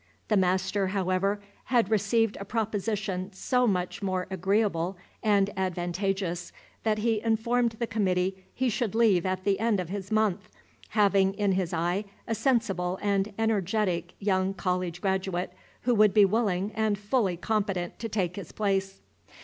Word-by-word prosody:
The 215 - +3
master, 190 +1 +1
however, 190 +1 0 0.3
had 235 -4 +2
received 220 +1 +2
a - - -4
proposition 205 -3 -2
so 250 +6 +1
much 180 -2 -1
more 185 -2 -1
agreeable 190 -1 0 0.2
and 205 -2 +3
advantageous, 180 0 -2 0.3
that 215 -1 +1
he 220 0 +1
informed 230 +1 +1
the 235 +1 -2
committee 190 -3 0
he 260 - -1
should 225 -2 -1
leave 205 -6 +4
at 185 0 -2
the 195 -1 +1
end 225 -2 +2
of 180 -2 -4
his 195 0 -5
month, 215 -4 +1 0.4
having 200 -2 +3
in 205 -1 +1
his 185 -2 0
eye 175 +5 0 0.2
a 230 - 0
sensible 215 -7 0
and 200 0 0
energetic 200 -5 0
young 195 -1 0
college 180 -2 -2
graduate 190 -2 -1 0.3
who 245 - +2
would 210 -3 +4
be 210 -2 +8
willing 200 -2 0
and 215 -2 +1
fully 205 -3 0
competent 195 -3 -1
to 225 - -4
take 185 -4 -1
his 195 -5 -7
place. 195 -2 -1
195 Hz, 150 wpm, -28 LUFS, 185-215 Hz, 0.4 s, be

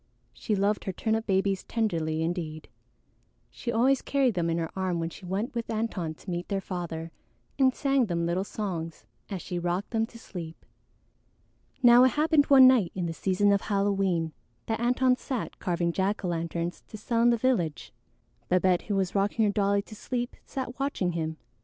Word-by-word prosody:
She 215 - -2
loved 200 +2 0
her 190 - -1
turnip 220 +3 -1
babies 195 -1 +1
tenderly 165 -8 -1
indeed; 165 -2 -4 0.8
she 235 - -4
always 255 +4 +3
carried 270 -4 +1
them 170 -3 0
in 165 - 0
her 165 -1 -2
arm 185 -2 -1
when 165 0 -2
she 185 - -11
went 200 +7 -2
with 235 -1 -4
Antone 210 -8 -2
to 185 - -12
meet 175 0 -3
their 200 -1 -1
father 170 -4 -5 0.5
and 260 -1 +4
sang 275 -4 +2
them 170 -2 -1
little 175 +3 0
songs 175 -6 -5 0.2
as 195 -4 -5
she 180 - -3
rocked 175 +3 -2
them 225 -1 +1
to 230 - -13
sleep. 170 -7 -9 1.2
Now 240 0 +8
it 255 - +4
happened 305 -1 +3
one 270 -2 +8
night 240 -9 +4
in 180 -2 -2
the 165 - -3
season 195 +4 +2
of 200 0 +3
Halloween 195 -5 0 0.3
that 225 -1 -2
Antone 250 +1 +3
sat 255 -4 -5
carving 170 -2 0
jack 195 +3 -1
o' - - 0
lanterns 170 +1 -3
to 215 - -9
sell 230 +2 0
in 240 - +5
the 235 - +3
village. 220 - -1 0.6
Babette, 180 0 +3
who 205 - 0
was 190 -2 0
rocking 205 +3 +2
her 205 - +2
dolly 200 0 +1
to 215 - -13
sleep, 245 +3 -4
sat 260 -1 -5
watching 270 -10 0
him. 160 -1 -3
195 Hz, 185 wpm, -28 LUFS, 175-230 Hz, 1.2 s, Now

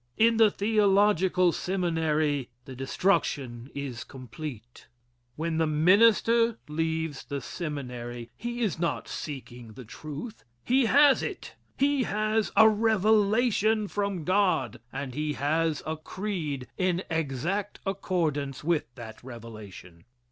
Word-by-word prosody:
In 230 +1 +4
the 220 -1 +6
theological 200 -4 +3
seminary 160 -7 0 0.2
the 135 -2 -9
destruction 135 -4 -1
is 140 -4 -5
complete. 125 -2 -9 0.5
When 160 +1 -2
the 160 - +2
minister 225 +8 +4
leaves 160 -1 -2
the 140 -1 -4
seminary, 125 -6 -6
he 240 - -5
is 200 -9 0
not 170 0 -1
seeking 125 -6 -7
the 125 +2 -10
truth. 155 - -8 0.2
He 255 +1 +3
has 285 +2 +6
it. - - -6 0.2
He 280 0 +2
has 215 -1 0
a 220 +2 +8
revelation 215 0 +3
from 200 -4 -2
God, 185 - +1
and 135 -1 -5
he 150 +2 -2
has 155 +2 0
a 155 0 -3
creed 155 -7 -4
in 185 0 +1
exact 165 +7 -2
accordance 160 -8 -2
with 165 -1 +1
that 110 -2 -10
revelation. 110 -8 -11
160 Hz, 120 wpm, -27 LUFS, 135-205 Hz, 0.5 s, a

